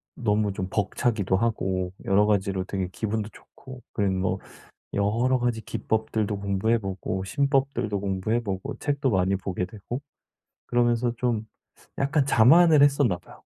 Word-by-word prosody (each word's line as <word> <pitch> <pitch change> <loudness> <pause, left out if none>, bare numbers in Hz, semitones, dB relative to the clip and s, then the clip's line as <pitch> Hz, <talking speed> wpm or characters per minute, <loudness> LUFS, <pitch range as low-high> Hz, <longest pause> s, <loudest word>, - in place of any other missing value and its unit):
너무 105 -3 +1
좀 95 -1 -3
벅차기도 105 0 0
하고 95 -5 -1
여러 100 +2 +4
가지로 95 -2 +1
되게 95 -2 -3
기분도 110 -1 -2
좋고 130 +2 -14
그리고 100 -3 +1
뭐 95 +1 -1 0.6
여러 115 +6 +2
가지 120 -2 -1
기법들도 110 -2 -2
공부해 100 +3 +1
보고 95 -1 -4
신법들도 135 -2 0
공부해 100 +4 -1
보고 100 +5 -4
책도 140 -2 0
많이 95 -1 +2
보게 95 -1 -3
되고 115 +5 -6 0.7
그러면서 120 0 +2
좀 115 -3 -1 0.5
약간 140 +1 +2
자만을 150 +5 +6
했었나 140 -9 +3
봐요. - - -16
110 Hz, 310 characters per minute, -26 LUFS, 95-125 Hz, 0.7 s, 자만을